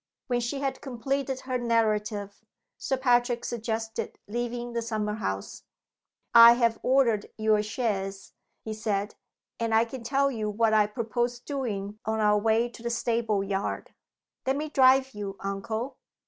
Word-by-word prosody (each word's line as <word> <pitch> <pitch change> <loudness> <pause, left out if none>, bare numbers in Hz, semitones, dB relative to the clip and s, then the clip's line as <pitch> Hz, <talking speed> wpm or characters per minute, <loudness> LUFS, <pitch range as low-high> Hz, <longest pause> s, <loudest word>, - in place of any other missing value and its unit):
When 245 -2 0
she 240 +4 -3
had 265 -2 -2
completed 265 +1 -2
her 255 -1 -2
narrative, 215 -3 0 0.4
Sir 265 - -1
Patrick 245 -2 +2
suggested 225 -1 -3
leaving 240 +2 -3
the 235 - -1
summer 215 -2 -2
house. 100 - -4 0.7
"I 235 0 +10
have 235 -2 +1
ordered 245 -5 +2
your 215 -1 +3
chaise," 200 -3 -3 0.3
he 220 - -4
said; 210 -1 -2 0.5
"and 230 -1 +1
I 225 +1 +5
can 245 +2 -8
tell 275 +4 +1
you 215 -4 -2
what 220 +1 +2
I 210 -1 +5
propose 240 +2 -2
doing 215 -7 -4
on 220 0 -1
our 210 -1 +4
way 225 +2 +2
to 235 - -13
the 235 - -2
stable 230 -3 0
yard." 195 0 -3 0.5
"Let 265 - +2
me 305 +2 -3
drive 265 -1 +5
you, 200 -1 -6
uncle!" 220 +6 -4
230 Hz, 150 wpm, -27 LUFS, 210-245 Hz, 0.7 s, I